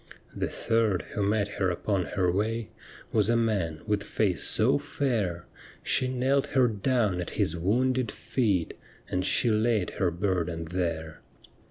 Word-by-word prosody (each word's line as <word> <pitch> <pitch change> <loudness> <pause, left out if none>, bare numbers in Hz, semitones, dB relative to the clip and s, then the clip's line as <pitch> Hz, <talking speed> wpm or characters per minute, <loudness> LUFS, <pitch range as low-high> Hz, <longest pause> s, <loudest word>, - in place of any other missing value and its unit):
The - - -1
third 115 -5 0
who 105 - -2
met 100 0 +1
her 95 -2 -1
upon 90 +1 -1
her 90 -3 +2
way 110 +4 -1 0.4
Was 105 -1 +2
a 120 - +3
man 100 -9 0
with 105 -1 0
face 95 -6 0
so - - +4
fair, 105 -11 -2 0.4
She 130 - +1
knelt 130 +2 +1
her 130 -1 +6
down 105 -3 0
at 85 - -5
His 80 - +1
wounded 125 +7 +1
feet. 100 -10 -1 0.4
And 90 - 0
she 110 +5 +3
laid 110 -3 +1
her 95 - +4
burden 85 -2 -2
there. 80 -2 -3
100 Hz, 150 wpm, -28 LUFS, 90-115 Hz, 0.4 s, her